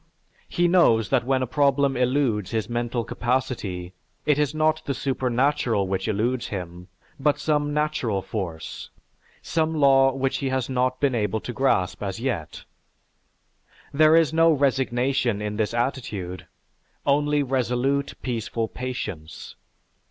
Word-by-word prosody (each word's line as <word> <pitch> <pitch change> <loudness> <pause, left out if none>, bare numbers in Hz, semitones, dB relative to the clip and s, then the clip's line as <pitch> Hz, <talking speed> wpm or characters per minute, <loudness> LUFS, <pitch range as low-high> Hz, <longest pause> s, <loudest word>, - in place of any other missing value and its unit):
He 175 0 +2
knows 165 - +4
that 130 -3 +2
when 130 -1 +2
a - - 0
problem 140 +1 +2
eludes 125 -5 +1
his 110 -2 -2
mental 120 0 -2
capacity, 115 -9 -2 0.3
it 150 -1 +3
is 150 -2 +1
not 155 0 +2
the 140 - -2
supernatural 125 -4 0
which 95 +1 -2
eludes 115 +4 0
him 90 -2 -6 0.3
but 145 +1 +2
some 150 -1 0
natural 145 -10 -1
force, 85 -7 -5 0.5
some 160 -1 0
law 135 -2 +5
which 135 0 -1
he 135 - -2
has 130 -1 -1
not 130 0 0
been 140 -2 +2
able 110 -2 0
to 120 - -6
grasp 110 -7 +1
as 100 0 -4
yet. 115 - -3 1.3
There 155 +2 +5
is 165 -2 +4
no 165 0 +5
resignation 130 -4 +1
in 105 0 -4
this 105 -1 0
attitude; 115 -8 -3 0.6
only 145 +1 +2
resolute, 130 +2 0
peaceful 115 -2 -2
patience. 115 -12 -6
130 Hz, 135 wpm, -24 LUFS, 110-140 Hz, 1.3 s, law